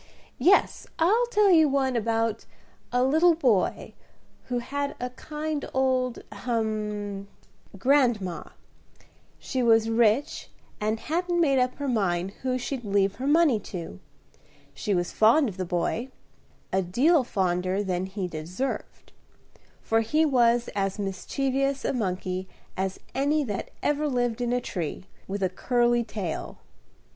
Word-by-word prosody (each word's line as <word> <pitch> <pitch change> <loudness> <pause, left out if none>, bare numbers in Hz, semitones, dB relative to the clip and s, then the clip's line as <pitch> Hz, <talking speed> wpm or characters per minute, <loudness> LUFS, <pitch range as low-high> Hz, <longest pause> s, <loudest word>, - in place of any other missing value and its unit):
Yes, 390 +3 +3
I'll 430 +9 +3
tell 420 -4 +4
you 320 -4 +6
one 265 -2 +1
about 225 -1 0 0.5
a 245 +1 +2
little 320 +6 +4
boy 245 - +1 0.5
who 250 - -2
had 280 +4 -3
a 250 0 -4
kind 300 +2 -4
old 255 -2 +1
ahem! 210 -4 -3 0.5
grandma. 235 -7 +2 0.9
She 260 - -3
was 225 -1 +4
rich, 230 +4 +1 0.3
and 215 +1 -1
hadn't 345 +2 -1
made 275 -5 +3
up 250 0 +1
her 285 - -4
mind 190 -6 0
who 255 -1 0
she'd 255 0 -4
leave 200 -1 +1
her 260 +3 -3
money 295 -6 +4
to. 180 -4 -7 0.7
She 205 -4 -1
was 175 -1 -1
fond 245 +7 +4
of 195 -4 -6
the 185 - -2
boy, 180 +8 -1 0.6
a 190 - +3
deal 260 - +3
fonder 185 -2 0
than 185 -1 -2
he 190 -1 -4
deserved, 175 +11 -5 0.7
for 225 0 +2
he 305 +9 +2
was 240 -4 +3
as 195 -1 -1
mischievous 270 +7 -1
a - - 0
monkey 185 -4 -2 0.3
as 190 0 -2
any 290 +3 +1
that 205 -7 -4
ever 295 +1 +1
lived 245 -3 -1
in 240 0 0
a 250 0 +1
tree, 180 -3 -4 0.2
with 200 0 -3
a - - +4
curly 240 +5 +1
tail. 195 -8 -5
240 Hz, 135 wpm, -26 LUFS, 195-275 Hz, 0.9 s, you